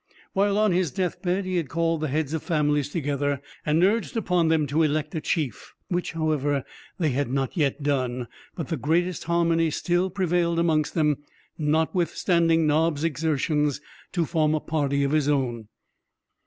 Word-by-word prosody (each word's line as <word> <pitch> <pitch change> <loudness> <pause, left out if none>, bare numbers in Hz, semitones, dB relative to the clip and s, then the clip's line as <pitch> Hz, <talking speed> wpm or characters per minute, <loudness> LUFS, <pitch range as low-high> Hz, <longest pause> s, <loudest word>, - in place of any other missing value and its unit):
While 200 +1 +2
on 215 -1 +3
his 180 -2 +1
deathbed, 185 +4 -1
he 185 -1 -1
had 160 -6 -2
called 165 -1 0
the 155 - 0
heads 150 +1 -1
of 160 - -1
families 150 -4 +1
together, 145 -3 -1 0.2
and 155 +3 +2
urged 220 +4 +1
upon 180 -6 +2
them 160 -2 +3
to 145 +4 +1
elect 155 0 0
a 160 - -2
chief; 150 - -3
which, 175 -1 -2
however, 145 -4 0 0.3
they 160 -4 +1
had 135 0 -1
not 135 +3 -1
yet 145 -3 0
done; 130 -4 -1 0.3
but 165 - -5
the 165 - -1
greatest 170 +6 0
harmony 165 -1 +2
still 175 +4 0
prevailed 175 -2 0
amongst 160 -3 +1
them, 150 -4 +2 0.4
notwithstanding 165 +1 +2
Nobbs's 155 0 +2
exertions 150 -2 0 0.3
to 170 -3 0
form 155 -2 +1
a - - 0
party 140 -3 0
of 140 - 0
his 150 -2 +2
own. 120 -6 -1
160 Hz, 165 wpm, -25 LUFS, 145-170 Hz, 0.4 s, on